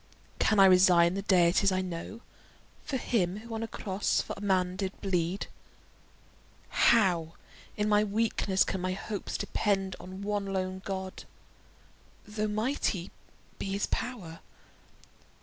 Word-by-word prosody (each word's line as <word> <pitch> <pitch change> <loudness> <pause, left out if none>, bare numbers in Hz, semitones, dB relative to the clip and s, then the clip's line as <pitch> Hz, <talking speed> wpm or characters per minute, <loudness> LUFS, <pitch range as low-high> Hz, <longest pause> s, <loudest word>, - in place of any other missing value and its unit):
Can 215 -2 +3
I 195 - +9
resign 180 -2 +6
the 195 - -2
deities 185 0 +4
I 185 0 +1
know 185 +5 -6 0.6
For 270 - -2
him 195 -7 0
who 225 +2 -9
on 220 - -3
a 225 - -3
cross 200 -2 -1
for - - -3
man 185 -3 +1
did 190 0 -4
bleed? 180 -1 -1 1.2
How 180 -8 +3 0.4
in 210 0 0
my 210 0 +4
weakness 210 -2 +1
can 190 - -3
my 185 0 -1
hopes 195 +1 -4
depend 195 -3 -1
On 185 +2 -8
one 205 -1 -2
lone 190 -1 -3
God, 190 -1 -5 1.0
though 215 0 -2
mighty 215 -4 -1 0.5
be 195 - -3
his 200 - 0
pow'r? 190 -10 -4
195 Hz, 130 wpm, -29 LUFS, 185-210 Hz, 1.2 s, I